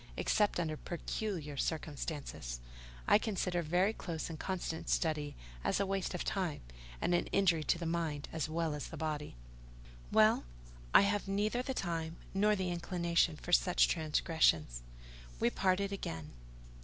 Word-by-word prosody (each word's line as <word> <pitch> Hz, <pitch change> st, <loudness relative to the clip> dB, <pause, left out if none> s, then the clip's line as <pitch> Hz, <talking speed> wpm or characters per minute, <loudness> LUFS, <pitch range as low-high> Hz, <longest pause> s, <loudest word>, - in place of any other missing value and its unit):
Except 210 Hz, -4 st, +2 dB
under 155 Hz, -3 st, -1 dB
peculiar 170 Hz, -4 st, -4 dB
circumstances, 145 Hz, -, -3 dB, 0.5 s
I 205 Hz, -, +7 dB
consider 185 Hz, -5 st, -1 dB
very 180 Hz, +6 st, +2 dB
close 165 Hz, -5 st, -4 dB
and 155 Hz, -, -7 dB
constant 175 Hz, -4 st, -3 dB
study 150 Hz, -3 st, 0 dB, 0.3 s
as -, -, +1 dB
a 200 Hz, -, +2 dB
waste 195 Hz, -2 st, -1 dB
of 180 Hz, -, -2 dB
time, 180 Hz, -6 st, -1 dB, 0.4 s
and -, -, +1 dB
an 175 Hz, -, +2 dB
injury 180 Hz, -5 st, +3 dB
to -, -, +2 dB
the 170 Hz, -, -4 dB
mind 160 Hz, -4 st, -1 dB
as 160 Hz, -1 st, -1 dB
well 165 Hz, -1 st, 0 dB
as 150 Hz, -, -4 dB
the 165 Hz, -, -8 dB
body." 150 Hz, -, -3 dB, 0.8 s
"Well, -, -, +5 dB, 0.5 s
I -, -, +9 dB
have 200 Hz, 0 st, +1 dB
neither 210 Hz, +5 st, +1 dB
the 265 Hz, +1 st, -3 dB
time 165 Hz, -4 st, -2 dB, 0.2 s
nor 210 Hz, +2 st, +3 dB
the 185 Hz, -2 st, -1 dB
inclination 170 Hz, -1 st, +1 dB
for 175 Hz, -, -8 dB
such 180 Hz, +1 st, +5 dB
transgressions." 150 Hz, -, +2 dB, 0.6 s
We 120 Hz, -, +3 dB
parted 195 Hz, +1 st, +1 dB
again. 80 Hz, -, -5 dB
170 Hz, 150 wpm, -34 LUFS, 155-195 Hz, 0.8 s, I